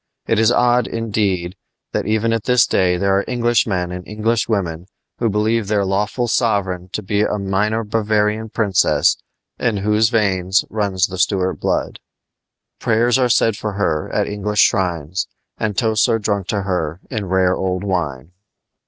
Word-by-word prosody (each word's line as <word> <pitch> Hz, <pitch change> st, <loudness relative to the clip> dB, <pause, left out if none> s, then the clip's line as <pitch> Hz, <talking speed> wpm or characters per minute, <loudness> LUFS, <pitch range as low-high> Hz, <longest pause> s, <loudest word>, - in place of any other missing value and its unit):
It 115 Hz, -, +1 dB
is 110 Hz, +1 st, +4 dB
odd, 120 Hz, 0 st, +3 dB
indeed, 100 Hz, -6 st, -1 dB, 0.4 s
that -, -, -2 dB
even 110 Hz, +1 st, +1 dB
at 115 Hz, -2 st, -2 dB
this 125 Hz, -1 st, +4 dB
day 90 Hz, -1 st, +1 dB
there 100 Hz, +1 st, +1 dB
are -, -, -1 dB
Englishmen 115 Hz, -7 st, 0 dB
and 90 Hz, 0 st, -6 dB
Englishwomen 105 Hz, -5 st, -1 dB, 0.3 s
who 115 Hz, -, +1 dB
believe 105 Hz, +1 st, 0 dB
their 105 Hz, -1 st, +1 dB
lawful 105 Hz, +5 st, -1 dB
sovereign 95 Hz, -6 st, 0 dB
to 105 Hz, -, -3 dB
be 100 Hz, +2 st, 0 dB
a 105 Hz, -, 0 dB
minor 105 Hz, +3 st, 0 dB
Bavarian 110 Hz, 0 st, 0 dB
princess 100 Hz, -4 st, +2 dB, 0.4 s
in 115 Hz, -4 st, 0 dB
whose 105 Hz, +2 st, +2 dB
veins 95 Hz, -4 st, +2 dB
there -, -, -14 dB
runs 100 Hz, -4 st, +1 dB
the 95 Hz, -2 st, -7 dB
Stuart 95 Hz, 0 st, 0 dB
blood. -, -, -1 dB, 0.8 s
Prayers 120 Hz, +3 st, +2 dB
are 125 Hz, -1 st, +2 dB
said 115 Hz, -2 st, +3 dB
for 105 Hz, 0 st, -4 dB
her 85 Hz, -6 st, -1 dB
at -, -, +1 dB
English 105 Hz, 0 st, 0 dB
shrines, 90 Hz, -2 st, 0 dB, 0.3 s
and 105 Hz, -3 st, -2 dB
toasts 110 Hz, +1 st, +2 dB
are 115 Hz, -, +3 dB
drunk 100 Hz, -3 st, -2 dB
to 100 Hz, -2 st, -1 dB
her 90 Hz, -4 st, -2 dB
in 110 Hz, -6 st, -3 dB
rare 95 Hz, 0 st, +2 dB
old 95 Hz, 0 st, -2 dB
wine. 85 Hz, -7 st, -3 dB
105 Hz, 160 wpm, -19 LUFS, 95-110 Hz, 0.8 s, is